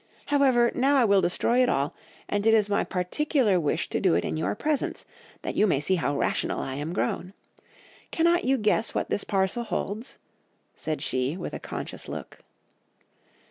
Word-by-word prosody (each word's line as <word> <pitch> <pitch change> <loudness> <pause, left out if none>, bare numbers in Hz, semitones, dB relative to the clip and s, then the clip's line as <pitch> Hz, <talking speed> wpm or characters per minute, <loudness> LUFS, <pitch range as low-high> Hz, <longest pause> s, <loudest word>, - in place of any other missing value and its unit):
However, 255 -4 +4
now 275 +3 +3
I 260 -3 +5
will 200 -2 +4
destroy 235 +8 +2
it 250 - +3
all, 140 +1 0 0.3
and 205 +1 0
it 225 - +6
is 210 -2 +3
my 205 - +1
particular 210 - +1
wish 150 -4 -1
to - - -1
do - - +3
it 85 - 0
in - - -2
your 160 +5 -1
presence, 300 +4 -2 0.4
that - - -3
you 215 - +3
may 140 - +2
see 150 +6 0
how 145 -5 0
rational - - 0
I 135 - -4
am 145 +4 -4
grown. 185 0 -2 0.8
Cannot 340 +1 +2
you 270 +1 +2
guess 215 0 +1
what - - -2
this 205 - 0
parcel 195 +3 0
holds?' 225 +2 -4 0.6
said 155 -2 -3
she 130 +3 -1
with - - -6
a - - -4
conscious - - -6
look. - - -7
205 Hz, 180 wpm, -26 LUFS, 170-250 Hz, 0.8 s, it